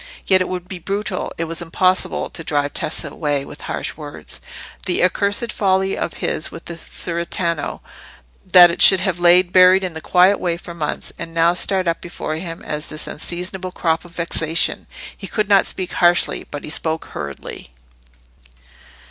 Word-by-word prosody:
Yet 190 Hz, -1 st, +5 dB
it 185 Hz, -, -1 dB
would 180 Hz, -1 st, -5 dB
be 185 Hz, -1 st, -6 dB
brutal—it 195 Hz, -2 st, -3 dB
was 165 Hz, +1 st, -5 dB
impossible—to 180 Hz, 0 st, 0 dB
drive 145 Hz, -2 st, -1 dB
Tessa 155 Hz, -, -2 dB
away 145 Hz, -3 st, -2 dB
with -, -, -11 dB
harsh -, -, -3 dB
words. 145 Hz, -, -8 dB, 0.5 s
That 180 Hz, -, +1 dB
accursed 200 Hz, +5 st, 0 dB
folly 190 Hz, -1 st, +1 dB
of -, -, -4 dB
his 155 Hz, -, -2 dB
with 165 Hz, -, -11 dB
the 170 Hz, -, -6 dB
cerretano—that 170 Hz, -, 0 dB
it -, -, -3 dB
should 190 Hz, -, +8 dB
have 185 Hz, -3 st, -1 dB
lain 175 Hz, +1 st, +5 dB
buried 185 Hz, +1 st, +6 dB
in 180 Hz, -3 st, -4 dB
a 160 Hz, -, -6 dB
quiet 185 Hz, +4 st, +4 dB
way 170 Hz, -1 st, -1 dB
for 170 Hz, 0 st, -9 dB
months, 155 Hz, -3 st, -4 dB
and 165 Hz, 0 st, -7 dB
now 165 Hz, +1 st, +4 dB
start 185 Hz, 0 st, 0 dB
up 165 Hz, -, 0 dB
before 160 Hz, -2 st, -5 dB
him 165 Hz, 0 st, -7 dB
as 150 Hz, 0 st, -4 dB
this 155 Hz, -, -5 dB
unseasonable 180 Hz, +3 st, -3 dB
crop 160 Hz, -2 st, 0 dB
of 175 Hz, 0 st, -16 dB
vexation! 165 Hz, -1 st, +1 dB, 0.3 s
He 195 Hz, -, -9 dB
could 210 Hz, 0 st, -1 dB
not 200 Hz, -1 st, +4 dB
speak 185 Hz, -1 st, -3 dB
harshly, 175 Hz, 0 st, +2 dB
but 145 Hz, -, -7 dB
he -, -, -5 dB
spoke 160 Hz, 0 st, -2 dB
hurriedly. 70 Hz, -2 st, -7 dB
175 Hz, 165 wpm, -20 LUFS, 160-185 Hz, 0.5 s, should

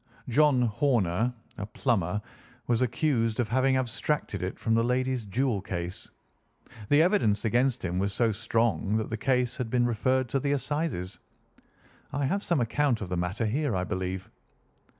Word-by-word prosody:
John 135 Hz, 0 st, +4 dB
Horner, 115 Hz, -, +1 dB, 0.3 s
a 100 Hz, -, -3 dB
plumber, 105 Hz, -, 0 dB, 0.5 s
was 120 Hz, 0 st, +1 dB
accused 120 Hz, -3 st, +1 dB
of 120 Hz, -, +1 dB
having 130 Hz, +2 st, +3 dB
abstracted 130 Hz, -3 st, -2 dB
it 90 Hz, +1 st, -3 dB
from 115 Hz, -, 0 dB
the 115 Hz, 0 st, +3 dB
lady's 125 Hz, -1 st, 0 dB
jewel 110 Hz, +1 st, 0 dB
case. 90 Hz, -3 st, -5 dB, 0.8 s
The 145 Hz, +2 st, +6 dB
evidence 145 Hz, -, +2 dB
against 120 Hz, +1 st, +1 dB
him 90 Hz, +1 st, -1 dB
was 100 Hz, +1 st, 0 dB
so 115 Hz, +2 st, +2 dB
strong 115 Hz, -1 st, 0 dB
that 110 Hz, -, -3 dB
the -, -, 0 dB
case 125 Hz, 0 st, +1 dB
has 125 Hz, -, -2 dB
been 120 Hz, +1 st, +2 dB
referred 130 Hz, +2 st, +1 dB
to 135 Hz, -, +1 dB
the 140 Hz, +2 st, 0 dB
Assizes. 140 Hz, -, -2 dB, 0.9 s
I 140 Hz, 0 st, -1 dB
have 195 Hz, +9 st, 0 dB
some 170 Hz, -6 st, 0 dB
account 120 Hz, 0 st, +1 dB
of 95 Hz, -, -5 dB
the 90 Hz, -, -1 dB
matter 90 Hz, +6 st, -1 dB
here, 135 Hz, +2 st, 0 dB
I 90 Hz, -, 0 dB
believe." 95 Hz, 0 st, -3 dB
120 Hz, 165 wpm, -28 LUFS, 105-130 Hz, 0.9 s, The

